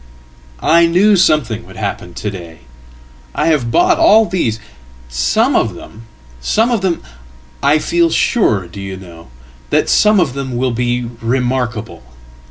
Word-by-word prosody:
"I 170 +1 +4
knew 195 +5 +3
something 140 - +1
would - - -13
happen - - -5
to 105 - -4
day. 90 -4 -9
And - - -24 0.8
I - - 0
have 140 -7 +1
bought 355 - +2
all 225 -9 +5
these. 165 - -2 0.5
Someof 65 +2 +1
them 115 +1 -13 0.3
some 220 - +1
of 230 -4 0
them 185 -3 -1 0.6
I 145 +2 +3
feel 335 - +1
sure, 110 - +1
do 100 +3 -10
you 95 -1 -6
know, 85 -4 -13 0.4
that - - +1
some 210 -1 +4
of 155 -8 0
them 130 -3 -4
will 130 +1 0
beremarkable. 120 - -2
125 Hz, 145 wpm, -15 LUFS, 110-185 Hz, 0.8 s, all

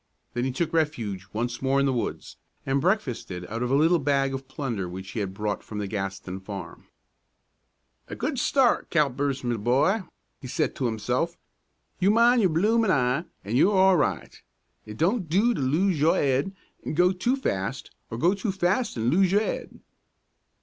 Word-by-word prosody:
Then 120 +1 -1
he 130 - -1
took 165 +5 -2
refuge 115 - -1
once 120 +2 -3
more 135 +1 +2
in 140 - +2
the 135 - +1
woods, 120 - -4 0.3
and 135 +1 +1
breakfasted 125 - -1
out 115 +5 -5
of 125 - -1
a 135 - +2
little 165 +4 +4
bag 135 -1 +1
of 135 0 -6
plunder 115 -10 -4
which 95 +1 -8
he 110 - -4
had 100 -2 -2
brought 105 +1 -3
from 105 - -8
the 105 - -2
Gaston 95 -2 -4
farm. 100 0 -8 1.2
"A - - -6
good 280 -5 -2
start, 260 -1 +2
Callipers, 140 -3 0
me 120 -1 -1
boy," 130 - +2 0.4
he 130 - -7
said - - -1
to 130 - 0
himself. 125 +9 -1 0.6
"You 190 +1 +3
mind 235 +3 +5
your 190 - +3
bloomin' 215 +7 +2
eye 135 +1 +1 0.2
an' 105 +4 -2
you're 190 +9 +4
all 190 0 +6
right. 95 - -1 0.5
It 105 0 -8
don't 185 +1 0
do 210 +9 +3
to 210 - -3
lose 160 +6 +1
your 160 +2 +4
'ead 140 +8 0 0.3
an' - - -4
go 180 +2 +4
too 215 +8 0
fast, 100 - -3 0.2
or 115 - -5
go 170 +9 +3
too 200 +1 -2
fast 190 - 0
an' 115 +2 +1
lose 185 +3 +3
your 205 +2 +3
'ead." - - -5
140 Hz, 185 wpm, -26 LUFS, 115-185 Hz, 1.2 s, all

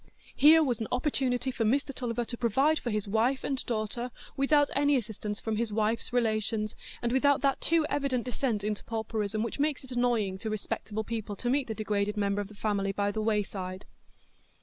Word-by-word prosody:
Here 315 +3 +7
was 245 -6 0
an 220 - -3
opportunity 255 -1 0
for 235 - -1
Mr 275 +5 +1
Tulliver 240 -2 -2
to 240 - -5
provide 270 +7 +2
for 240 - -3
his 210 -2 -1
wife 230 +6 +1
and 270 -2 -1
daughter 235 +1 -2 0.3
without 290 +1 +3
any 285 +1 +4
assistance 215 -3 -3
from 220 -1 -2
his 230 -1 -1
wife's 220 +3 0
relations, 215 -2 0 0.3
and 235 - +1
without 280 +2 +3
that 275 -1 +1
too 330 -1 +3
evident 275 -5 0
descent 240 -3 -1
into 210 0 -2
pauperism 220 -1 -2
which 230 - -4
makes 295 -1 0
it 265 - -12
annoying 235 -6 +1
to 220 - -3
respectable 215 0 -3
people 220 -2 -4
to 245 +4 -1
meet 275 0 +1
the 220 - -3
degraded 210 -1 -1
member 200 0 +1
of 205 - -5
the 210 - -14
family 200 -2 0
by 200 +1 0
the 215 - -2
wayside. 195 -3 -2
230 Hz, 195 wpm, -29 LUFS, 210-260 Hz, 0.3 s, Here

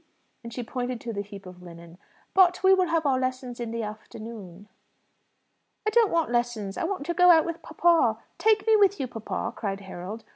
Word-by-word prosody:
and 235 - -8
she 245 +2 -5
pointed 245 +1 -4
to 230 0 -6
the 200 - -3
heap 200 -1 -11
of 180 -1 -12
linen. 170 0 -13 0.3
"But 365 -1 +4
we 380 0 +7
will 370 -1 +3
have 330 -2 0
our 265 -2 +2
lessons 255 -1 -3
in 235 -1 -4
the 230 0 -3
afternoon." 210 -2 -9 1.2
"I - - +2
don't 455 -2 +4
want 330 -7 +1
lessons; 240 -5 -1
I - - -2
want 365 -5 -3
to 345 - -1
go 360 +1 +5
out 325 -2 +6
with 335 -1 -5
papa. 335 +1 +2 0.2
Take 435 -2 +3
me 445 -1 +5
with 400 -3 +4
you, 270 - -1
papa," 225 -3 -5
cried 200 -2 -4
Harold. 190 +3 -8
245 Hz, 205 wpm, -26 LUFS, 210-340 Hz, 1.2 s, we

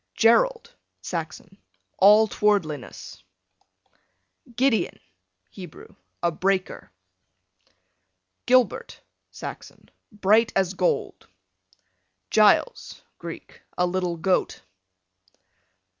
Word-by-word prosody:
Gerald, 460 - +2 0.3
Saxon, 170 +3 -7 0.4
all 210 +3 +6
towardliness. 185 - -2 1.3
Gideon, 250 -3 0 0.5
Hebrew, 180 -5 -12 0.3
a 170 - +2
breaker. 185 +3 -2 1.6
Gilbert, 255 -1 +1 0.3
Saxon, - - -10 0.2
bright 215 +2 +2
as 190 -1 +1
gold. 180 -1 -2 1.0
Giles, 215 - +2 0.2
Greek, - - -10 0.2
a 180 - +2
little 180 -1 -2
goat. 180 - -1
195 Hz, 70 wpm, -24 LUFS, 180-220 Hz, 1.6 s, all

